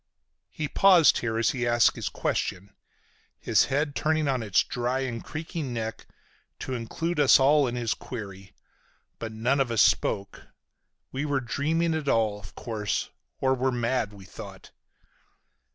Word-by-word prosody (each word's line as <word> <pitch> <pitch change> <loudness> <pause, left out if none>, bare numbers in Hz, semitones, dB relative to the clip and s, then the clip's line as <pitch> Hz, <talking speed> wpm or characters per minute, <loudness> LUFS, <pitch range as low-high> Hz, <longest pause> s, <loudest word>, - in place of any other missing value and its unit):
He 155 - -4
paused 175 -1 +5
here 115 -2 -2
as 115 -1 +2
he 125 -2 -2
asked 120 0 +4
his - - -3
question, 100 +2 -3 0.7
his - - +3
head 145 +2 -1
turning 155 -1 +1
on 130 -3 0
its 105 -4 +2
dry 125 +2 -2
and 120 -4 -4
creaking 155 -3 -5
neck 110 -2 -5 0.5
to 130 - -4
include 150 +8 -3
us 140 -2 +6
all 140 +1 +4
in 120 - -3
his 120 -2 0
query. 100 -5 -8 0.7
But 110 - -5
none 120 +6 0
of 135 -3 +1
us 115 -3 +4
spoke. 100 0 0 0.6
We 135 +2 -3
were 145 -2 0
dreaming 160 +7 0
it 155 -2 -3
all, 110 -4 +1
of 90 -4 -14
course, 110 -4 -3 0.3
or 130 0 +2
were 130 0 0
mad, 120 -2 -1
we 100 -2 -13
thought. - - -11
125 Hz, 155 wpm, -26 LUFS, 110-145 Hz, 0.7 s, us